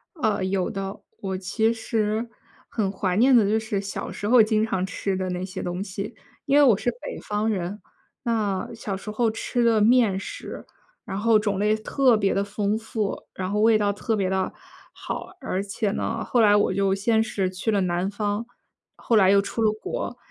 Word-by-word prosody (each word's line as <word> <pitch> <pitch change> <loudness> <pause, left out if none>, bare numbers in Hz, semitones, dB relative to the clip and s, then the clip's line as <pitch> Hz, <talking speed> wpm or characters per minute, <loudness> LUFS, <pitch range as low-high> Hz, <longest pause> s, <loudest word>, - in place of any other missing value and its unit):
呃， 215 - 0
有 190 -1 0
的。 195 +1 -5 0.2
我 190 -1 -3
其 220 +5 +1
实 220 0 -1 0.4
很 200 -4 -1
怀 190 -2 -1
念 255 +4 +6
的 230 - +6
就 220 +1 +2
是 220 -3 -2
小 195 -1 -5
时 205 - -4
候 240 +1 +7
经 215 0 +2
常 190 -4 -1
吃 195 0 -2
的 185 0 -2
那 180 0 -3
些 185 0 -6
东 180 +2 -3
西。 200 +3 -6 0.3
因 280 0 +3
为 295 - +7
我 240 -8 +6
是 245 - 0
北 - - -6
方 210 +1 0
人， 200 0 -3 0.4
那 215 -6 -1
小 220 -3 -4
时 205 +3 -7
候 225 +2 +1
吃 240 +2 -1
的 225 -2 +4
面 225 -3 +4
食， 195 - -7 0.4
然 195 -5 -5
后 225 +2 +4
种 205 -2 -1
类 210 +1 +3
特 250 +3 +2
别 200 -2 +1
地 195 - +1
丰 205 +1 -1
富， 220 -2 -3
然 185 0 -4
后 210 - 0
味 220 +1 +5
道 205 -1 +1
特 215 +2 -2
别 195 -3 0
地 190 0 -1 0.4
好。 - - -5
而 195 -7 -2
且 200 +1 -2
呢， - - -2
后 245 - 0
来 210 -2 +6
我 205 -2 +3
就 195 0 +2
先 220 +3 +2
是 195 -4 -1
去 185 +4 -4
了 205 -2 +2
南 180 +1 0
方， 205 +2 -2 0.5
后 230 - +1
来 190 -2 +6
又 200 0 +6
出 215 +3 -4
了 215 -1 +4
国。 245 - -4
205 Hz, 220 characters per minute, -24 LUFS, 195-225 Hz, 0.5 s, 候